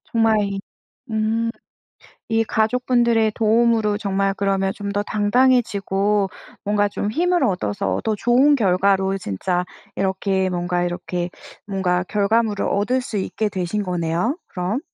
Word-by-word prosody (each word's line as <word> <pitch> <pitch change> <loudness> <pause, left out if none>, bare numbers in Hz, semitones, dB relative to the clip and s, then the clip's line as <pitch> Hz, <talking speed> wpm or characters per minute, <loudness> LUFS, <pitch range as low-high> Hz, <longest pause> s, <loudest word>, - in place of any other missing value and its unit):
정말 225 -1 +3
이 200 -1 -3 0.5
음. 220 +1 0 0.8
이 225 0 +2
가족분들의 235 -1 +2
도움으로 225 -1 +2
정말 195 -1 0
그러면 195 -1 0
좀 200 0 -5
더 205 - 0
당당해지고 205 -3 +2 0.4
뭔가 205 0 +2
좀 205 +1 -3
힘을 350 +5 +1
얻어서 200 0 -1
더 220 - +1
좋은 255 +7 +4
결과로 195 -3 +2
진짜 175 - -2 0.3
이렇게 190 0 0
뭔가 175 0 -1
이렇게 175 0 -3 0.4
뭔가 185 -3 0
결과물을 210 +2 +1
얻을 220 +6 +1
수 230 -3 -5
있게 210 +2 -1
되신 190 +2 -2
거네요 180 - -1
그럼. 185 +8 -2
205 Hz, 275 characters per minute, -21 LUFS, 190-225 Hz, 0.8 s, 좋은